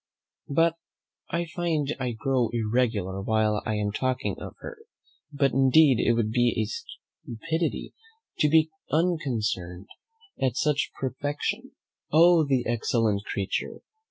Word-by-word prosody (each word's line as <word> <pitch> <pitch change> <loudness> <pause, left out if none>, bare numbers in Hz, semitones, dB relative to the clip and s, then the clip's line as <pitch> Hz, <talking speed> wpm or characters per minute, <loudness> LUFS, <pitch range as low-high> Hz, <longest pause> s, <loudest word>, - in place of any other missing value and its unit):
But 165 +3 +2 0.5
I 170 0 -1
find 160 -4 -1
I 125 -2 -2
grow 125 +1 0
irregular 110 -4 0
while 110 0 +1
I 110 - 0
am 105 -1 -1
talking 130 +4 -1
of - - -8
her; 480 - -8 0.5
but 140 -2 +1
indeed 135 0 +5
it 120 - +3
would 115 -2 0
be 120 -2 +2
stupidity 160 +8 -5 0.5
to 150 - +4
be 160 +1 +4 0.2
unconcerned 115 - -1 0.5
at 130 -2 0
such 150 -1 +1
perfection. 145 +2 -3 0.4
Oh 165 +1 +6
the 135 -4 0
excellent 115 -3 0
creature! 100 -1 -3
130 Hz, 120 wpm, -26 LUFS, 110-150 Hz, 0.5 s, Oh